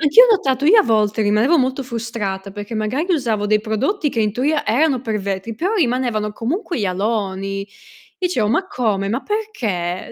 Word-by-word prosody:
anch'io 320 +11 +7
ho - - +3
notato. 270 -8 +1
Io, 425 +7 +7
a - - +2
volte, 215 -2 +1
rimanevo 215 +10 +3
molto 260 0 0
frustrata, 225 -5 -4
perché 205 +3 -7
magari 220 +9 -1
usavo 225 -9 0
dei 215 0 +3
prodotti 275 - -1
che 230 - -4
in 210 -1 +1
teoria 290 +6 0
erano 260 +3 +2
per 225 -3 -2
vetri, 195 +3 -4
però 365 - -1
rimanevano 245 - 0
comunque 325 - -3
gli 210 - 0
aloni. 195 0 -2 0.5
Dicevo: 355 - 0
"Ma 305 - +1
come? 215 - -1
Ma 235 +6 -2
perché?" 225 - -3
230 Hz, 180 wpm, -19 LUFS, 210-290 Hz, 0.5 s, anch'io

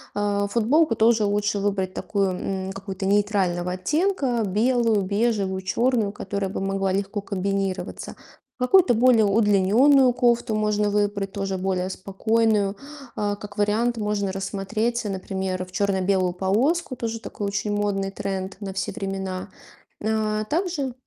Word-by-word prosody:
А, 205 0 0
футболку 235 +5 +2
тоже 220 0 +4
лучше 205 0 0
выбрать 195 -2 -1
такую, 195 -2 -1
м, 190 +1 -3
какую-то 195 0 -6
нейтрального 190 -3 +1
оттенка: 270 - 0
белую, 225 +1 +2
бежевую, 200 -2 0
чёрную, 230 +2 +1
которая 200 -1 -3
бы - - -4
могла 195 0 -1
легко 200 +2 -2
комбинироваться. 195 -1 -3 0.4
Какую-то 250 - +5
более 235 -2 +5
удлинённую 220 +6 +4
кофту 240 -2 +1
можно 210 -1 +1
выбрать 205 -1 0
тоже 195 -2 -3
более 185 0 -1
спокойную. 205 +1 0 0.4
А, 205 -1 -1
как 205 0 -10
вариант, 220 +4 +1
можно 210 -2 -1
рассмотреть, 215 +5 -2
например, 190 -1 -3
в 180 - -17
чёрно-белую 190 -2 +1
полоску. 250 - 0
Тоже 230 -1 -4
такой 205 - -5
очень 205 +1 -2
модный 200 -1 -1
тренд 195 -1 -4
на 195 -2 -5
все 190 -1 -2
времена. 195 -2 -4 0.5
Э, 215 0 0
также 315 -6 -1
205 Hz, 130 wpm, -24 LUFS, 195-225 Hz, 0.5 s, Какую-то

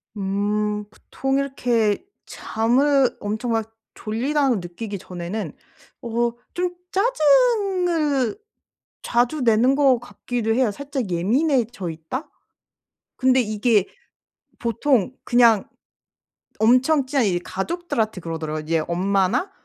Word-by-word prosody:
음. 210 +1 -1
보통 270 +5 -3
이렇게 245 - 0 0.2
잠을 260 +4 +1
엄청 220 +3 -3
막 225 0 -2 0.2
'졸리다.'고 260 +4 0
느끼기 200 +3 -5
전에는 180 +5 -5 0.5
어 235 0 0 0.2
좀 355 0 -1 0.2
짜증을 355 - +2 0.7
자주 245 +4 +1
내는 235 +3 +4
것 270 -4 +4
같기도 240 -2 -3
해요. 250 -3 +2
살짝 270 -2 -4
예민해져 235 - 0
있다? 205 - -6 0.9
근데 260 0 +3
이게 215 -2 +2 0.7
보통 240 0 +1
그냥 235 -4 +4 0.9
엄청 255 +5 +4
친한 270 -3 +1
이 175 -2 0
가족들한테 220 - -3
그러더라고요. 155 -2 -4
이제 165 +1 0
엄마나 190 - 0
235 Hz, 225 characters per minute, -22 LUFS, 205-275 Hz, 0.9 s, 내는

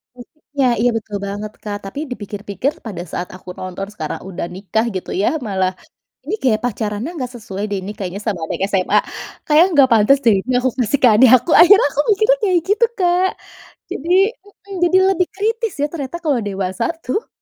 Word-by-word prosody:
Musik 250 +5 -15 0.2
ya, 255 - +4
Iya 245 +2 +3
betul 210 -2 -5
banget 205 +1 -5
Kak, 205 -1 -4
tapi 195 +8 -6
dipikir-pikir 205 +3 -3
pada 195 -6 -5
saat 180 - -4
aku 185 - -12
tonton 185 +1 -6
sekarang 160 -7 -5
udah 175 -2 -4
nikah 215 +4 -1
gitu 185 - -5
ya, - - +2 0.2
malah 190 -2 0 0.5
ini 315 +9 -5
gaya 240 -5 +3
pacarannya 220 +1 -3
nggak 250 -3 -4
sesuai 205 -4 -6
deh 200 - -2
ini 195 +2 -6
kayaknya 190 +1 -5
sama 210 -4 -2
anak - - -4
SMA, 185 -2 +2 0.5
kayaknya 310 +3 +5
nggak 275 -4 +5
pantes 225 +5 +5
deh 225 - +6
ini 255 +6 -3
aku 260 +1 +1
kasih 250 +2 +1
ke - - +8
adik 240 +4 +6
aku 250 - -9
akhirnya 395 -2 +7
aku 290 - 0
mikir 430 +2 0
kayak 370 -4 +3
gitu 440 +3 +4
Kak 365 0 +2 0.6
jadi 320 +5 -5 0.4
mhm, 400 -1 -14
jadi 370 - +3
lebih 365 -2 +1
kritis 450 +1 -1
ya 290 - +2
ternyata 300 0 -5
kalau 290 -6 +1
dewasa 195 +3 -2 0.2
tuh. 415 - -3
235 Hz, 190 wpm, -18 LUFS, 200-315 Hz, 0.6 s, ke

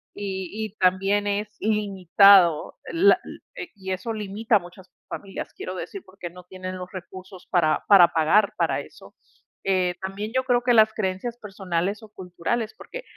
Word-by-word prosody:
Y 190 -3 -4 0.2
y 210 - -21
también 195 +2 +2
es 205 +1 -1
limitado 195 -4 +4 0.2
la 370 +5 +5
l - - -10 0.2
eh, 360 -7 -7
y 190 -1 -6
eso 185 +5 -3
limita 215 +1 0
a - - -3
muchas 180 +1 -14 0.2
familias, 195 -1 -7
quiero 185 - -6
decir, 390 - -7
porque 185 -2 -9
no 180 +1 -14
tienen 185 +1 -7
los 180 0 -8
recursos 185 0 -10
para 165 -4 +2
para 195 -4 +9
pagar 180 +7 +3
para - - +1
eso. - - -13 0.5
Eh, 185 -2 +1
también 195 +3 -5
yo 260 - +2
creo 245 -1 +2
que 245 0 +2
las 220 -1 +5
creencias 215 +4 -3
personales 195 0 -3
o 220 - -13
culturales, 200 +4 -4
porque - - -9
195 Hz, 170 wpm, -24 LUFS, 185-215 Hz, 0.5 s, para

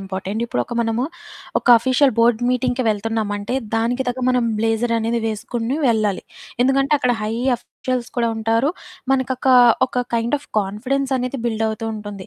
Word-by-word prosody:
Important. 195 +2 -4
ఇప్పుడొక 120 - -3
మనము 230 +2 0 0.5
ఒక - - -16
ఆఫీసియల్ 260 +3 +3
బోర్డ్ 230 0 +4
మీటింగ్‌కి 250 0 0
వెళ్తున్నామంటే, 210 0 -2 0.2
దానికి 240 +3 0
తగ్గ 250 +1 -3
మనం 250 -1 +2
బ్లేజరనేది 230 +1 0
వేసుకొని 230 +3 -3
వెళ్ళాలి. 215 -4 +1 0.4
ఎందుకంటే, 275 +2 +2
అక్కడ 250 -2 +2
హై 215 - -2 0.2
ఆఫీషియల్స్ 250 0 -5
కూడా 235 -1 +2
ఉంటారు. 225 +5 +1 0.4
మనకొకా, 260 0 +2 0.3
ఒక 250 -1 -2
కైండ్ 235 +3 0
ఆఫ్ 290 - -18
కాన్ఫిడెన్సనేది 255 +5 -1
బిల్డవుతూ 220 0 -2
ఉంటుంది. 205 -3 -8
235 Hz, 130 wpm, -20 LUFS, 220-255 Hz, 0.5 s, బోర్డ్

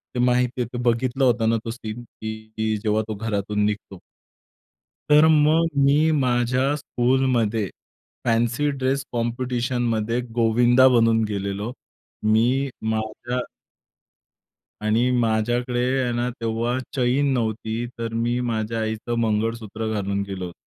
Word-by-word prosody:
ते - - -1
माहिती 125 0 +1
आहे 120 - -1
ते - - -3
बघितलं 125 +3 +1
होतं 115 -3 +3
ना 115 - +2
तो 115 - -3
सीन 115 0 -7
की 110 -1 -4
जेव्हा 110 0 +2
तो 110 - -3
घरातून 105 -1 -1
निघतो. 100 -3 -4 1.1
तर 150 +1 +7
मग 155 +2 +4 0.2
मी 150 +3 +4
माझ्या 130 0 +1
स्कूलमध्ये 120 -6 +1 0.6
फॅन्सी 120 +5 +1
ड्रेस 135 +1 0
कॉम्पिटिशनमध्ये 120 -1 -1 0.2
गोविंदा 120 +3 +5
बनून 115 -1 +3
गेलेलो. 100 +2 -3 0.6
मी 125 +5 +2 0.2
माझ्या 110 +3 -3 1.5
आणि 115 +4 +2
माझ्याकडे 120 +2 0 0.2
आहे 125 - 0
ना 120 +1 -1
तेव्हा 115 +1 -2 0.2
चैन 135 +2 +2
नव्हती, 110 -1 -2
तर 115 -1 -4
मी 120 +2 0
माझ्या 110 +1 -2
आईचं 110 +2 -2
मंगळसूत्र 110 0 -1
घालून 100 -1 -1
गेलो 95 -2 -5
होतो. 85 - -8
115 Hz, 120 wpm, -23 LUFS, 110-125 Hz, 1.5 s, तर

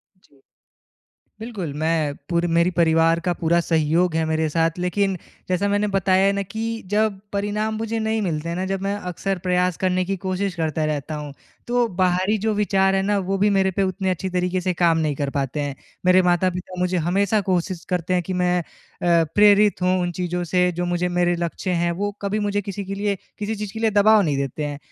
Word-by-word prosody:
जी। 145 -7 -28 1.0
बिल्कुल 210 -9 -5
मैं 155 -2 0 0.2
पूरे 170 0 +1
मेरे 170 +2 +3
परिवार 165 -1 +3
का 175 +1 0
पूरा 170 +1 +1
सहयोग 165 +1 +1
है 160 0 +1
मेरे 160 0 0
साथ। 165 +2 0
लेकिन 190 +2 0 0.3
जैसा 185 +2 +1
मैंने 205 +1 +1
बताया 190 0 +3
है 200 - +3
ना 200 0 -1
कि 195 +3 -7 0.3
जब 210 -1 +1
परिणाम 210 +2 -1
मुझे 225 +1 -2
नहीं 220 0 0
मिलते 165 -3 -2
हैं 170 - -2
ना 185 - -2
जब 195 0 -2
मैं 200 +1 -1 0.2
अक्सर 195 +2 -2
प्रयास 180 -1 +1
करने 185 -1 0
की 195 +2 -2
कोशिश 185 0 -1
करता 160 -2 -1
रहता 155 0 -2
हूँ 150 -1 -6 0.3
तो 240 0 +2
बाहरी 185 +3 +2
जो 220 +2 0
विचार 195 -2 +2
है 195 - +2
ना 205 +1 +1
वो 195 +1 -1
भी 205 +2 +3
मेरे 195 -1 +2
पे 195 +2 -1
उतनी 190 0 -1
अच्छी 185 +1 -1
तरीके 180 0 0
से 185 0 0
काम 170 -2 +3
नहीं 155 -2 0
कर 140 0 -2
पाते 140 +1 -2
हैं। 145 -1 -3 0.3
मेरे 185 +1 +6
माता-पिता 180 +1 0
मुझे 180 0 +1
हमेशा 200 +3 +2
कोशिश 185 -2 -2
करते 180 0 0
हैं 180 - +1
कि 185 - -5
मैं 180 -1 +1
अ, 170 0 -1
प्रेरित 205 -1 +5
हूँ 185 0 +2
उन 175 - -1
चीज़ों 180 0 -2
से 180 +1 +2
जो 175 +1 -2
मुझे 175 0 0
मेरे 175 0 +1
लक्ष्य 170 +2 -3
हैं 170 - +1
वो 205 +4 -2
कभी 200 +1 -1
मुझे 205 -1 0
किसी 200 +1 -5
के 195 +1 -5
लिए 200 0 -1 0.2
किसी 210 +1 -2
चीज़ 210 -1 -5
के 220 - -6
लिए 225 - +2
दबाव 210 +1 +5
नहीं 150 -6 0
देते 140 +2 -3
हैं। 145 -1 -5
185 Hz, 215 wpm, -22 LUFS, 170-200 Hz, 1.0 s, मेरे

